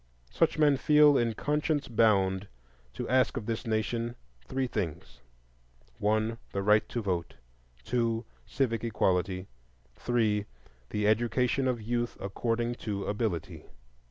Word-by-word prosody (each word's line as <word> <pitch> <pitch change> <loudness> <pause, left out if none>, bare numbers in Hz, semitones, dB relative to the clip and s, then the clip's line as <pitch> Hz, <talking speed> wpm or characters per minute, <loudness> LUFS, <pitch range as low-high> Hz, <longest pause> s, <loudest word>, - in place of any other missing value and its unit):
Such - - +2
men 145 -3 +4
feel 150 +1 +6
in 115 -3 +1
conscience 150 +1 0
bound 100 -4 +2 0.5
to - - -4
ask 130 +1 +2
of 105 - -4
this 115 0 -3
nation 115 +2 -1 0.3
three 135 0 -1
things: 95 -11 -4 0.8
1. 110 +2 +1
The 100 - -1
right 105 +1 +4
to 120 - -3
vote. 90 -4 -2 0.5
2. 115 -2 0 0.2
Civic 115 -5 -1
equality. 95 -4 0 0.5
3. 110 -4 +1 0.4
The 105 0 0
education 120 +4 +2
of 120 -3 -1
youth 120 +1 -2
according 115 +4 -1
to 100 -2 -3
ability. 105 -5 -3
115 Hz, 125 wpm, -29 LUFS, 105-120 Hz, 0.8 s, feel